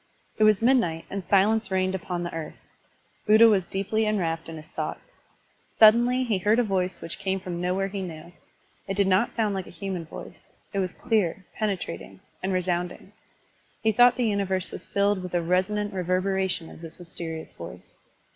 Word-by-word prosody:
It 215 - +6
was 215 0 +4
midnight 230 -11 +2
and 195 -1 -3
silence 210 +4 +3
reigned 185 0 +1
upon 175 -1 -3
the 175 - -5
earth. 160 -2 -5 0.7
Buddha 220 +2 +8
was 195 -5 +3
deeply 215 +3 0
enwrapt 165 -6 -1
in 165 - -7
his 155 +1 -12
thoughts. - - -5 0.7
Suddenly 240 +4 +6
he 220 -6 0
heard 210 +4 +3
a 245 - +4
voice 190 -3 -1
which 165 - -6
came 195 -1 -1
from 180 -2 -5
nowhere 185 +2 0
he 195 0 -5
knew. 170 -1 -8 0.5
It 195 0 -3
did 200 - +4
not 190 +4 +3
soimd 215 -3 0
like 190 -2 -4
a - - -10
human 180 -1 -5
voice; - - -11 0.2
it 200 - 0
was 185 -2 0
clear, 195 -4 0
penetrating, 180 - -4 0.2
and 190 - -1
resounding; 180 +1 -2 0.7
he 220 - +4
thought 245 +3 +6
the 250 - +1
universe 195 -3 0
was - - -6
filled 200 -1 +1
with 180 -1 -5
a 175 - +2
resonant 195 +4 0
reverberation 185 -1 -1
of - - -13
this 165 -1 -10
mysterious 165 -2 -7
voice. 85 0 -11
190 Hz, 180 wpm, -26 LUFS, 175-210 Hz, 0.7 s, Buddha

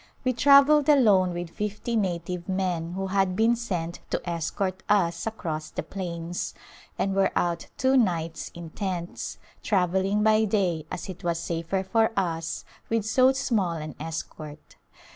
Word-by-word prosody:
We 255 -1 +2
travelled 280 +3 +6
alone 205 -11 +5
with 175 -1 -5
fifty 210 +4 -3
native 180 -3 -2
men 180 -3 -1
who 195 +1 -2
had 190 -1 +1
been 225 +4 +4
sent 175 -8 -3
to - - 0
escort 185 +3 -2
us 170 -3 +2
across 160 -8 -4
the - - -4
plains, 175 -2 -5 0.4
and 195 - 0
were 195 0 +2
out 170 -1 0
two 260 +1 +3
nights 170 -9 0
in 170 -2 -8
tents, 180 -3 -4 0.2
travelling 190 +1 +1
by 220 0 +4
day 180 -7 0
as 180 - -5
it 185 -3 -8
was 170 -1 0
safer 170 +3 -2
for 220 +3 +2
us 165 -4 -2 0.2
with 225 -2 0
so 255 +4 +5
small 210 -9 0
an 155 -1 -5
escort. 155 -1 -7
185 Hz, 150 wpm, -26 LUFS, 170-215 Hz, 0.4 s, travelled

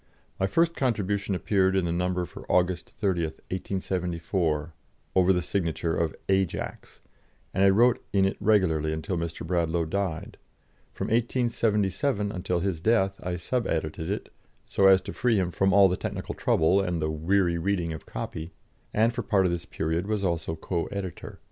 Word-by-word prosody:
My 95 - +2
first 165 - +2
contribution 105 -6 0
appeared 95 0 +2
in 95 -2 +2
the 85 - -1
number 90 +1 0
for - - -9
August 90 -1 +1
30, 95 -4 -1
1874, 85 -2 -2 0.4
over 95 0 +4
the 90 -2 +1
signature 85 -3 -1
of 80 -2 -1
"Ajax," 95 -2 -2 0.5
and 95 - +2
I 100 - +7
wrote 115 +5 +4
in 95 -1 +3
it 95 - 0
regularly 95 -8 +2
until 80 +4 -3
Mr. 85 -1 -4
Bradlaugh 85 -1 0
died; 90 -1 -3 0.5
from - - -4
1877 115 -1 +1
until 90 -2 -2
his 90 -4 -2
death 95 -2 +2
I 90 0 -3
sub 115 +8 -2
edited 80 +1 -2
it, 105 - -4 0.3
so 95 - +3
as 95 -1 +7
to - - -6
free 120 -2 +2
him 90 -2 0
from 95 +4 +2
all 100 0 +7
the 90 - 0
technical - - -4
trouble 95 +5 +3
and 90 -3 -1
the 75 0 -1
weary 85 +2 +1
reading 85 -2 -1
of 80 - -9
copy, 80 +2 -6 0.4
and 115 +2 +3
for - - -2
part 95 -3 +2
of 90 - +2
this 85 -1 -3
period 80 +4 -2
was 105 -2 -1
also 85 -3 -1
co 85 +1 -2
editor. 95 -3 -6
95 Hz, 170 wpm, -27 LUFS, 85-100 Hz, 0.5 s, I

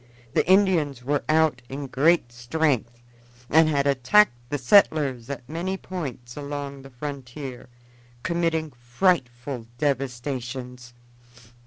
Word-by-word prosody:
The - - +1
Indians 170 -10 +3
were 145 +2 0
out 155 -4 +3
in 140 +1 -5
great 140 0 +2
strength 120 -2 -1 0.5
and 160 0 +6
had 140 -2 +1
attacked 140 +8 +4 0.2
the 145 - -1
settlers 135 - +3
at 130 -3 -6
many 175 +5 -3
points 135 -11 -6
along 140 -1 -5
the 135 - -12
frontier, 130 -1 -7 0.5
committing 165 -3 0
frightful 120 -2 -1
devastations. 125 -2 -3
140 Hz, 110 wpm, -25 LUFS, 125-155 Hz, 0.5 s, and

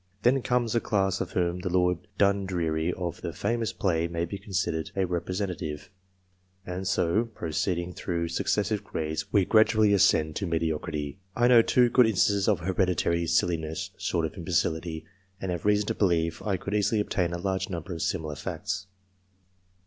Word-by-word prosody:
Then 130 +2 +4
comes 120 -2 0
a 120 - +3
class 95 -2 0
of - - -4
whom 90 0 0
the 90 - -3
Lord 90 -1 +2 0.2
Dundreary 90 -5 +1
of 90 -1 -5
the 85 - -3
famous 115 +5 -1
play 85 -3 0
may 85 0 -2
be 100 +4 -6
considered 90 -5 -2
a 95 -1 +1
representative; 90 -3 -3 0.7
and 90 +1 -4
so, 95 +4 +2
proceeding 85 -3 -2
through 85 -2 -2
successive 105 +4 0
grades, 80 -5 -4
we 100 -3 +4
gradually 110 -1 +4
ascend 80 -5 +3
to 100 - -2
mediocrity. 80 -2 -2 0.2
I 120 0 +4
know 120 -2 +8
two 125 +2 +4
good 125 -2 +6
instances 100 -1 +2
of 100 -5 +2
hereditary 85 -2 +1
silliness 85 +1 0
short 90 -4 -1
of 80 - -5
imbecility, 80 0 -1 0.3
and 95 - -3
have 85 +1 -4
reason 105 0 +3
to - - -1
believe 85 -4 +1
I 100 -3 -1
could 100 +3 -5
easily 105 +1 +2
obtain 90 -4 0
a 85 - -2
large 95 +1 -2
number 85 0 -5
of 80 - -5
similar 80 -5 -2
facts. 95 +6 -4
90 Hz, 165 wpm, -27 LUFS, 85-100 Hz, 0.7 s, know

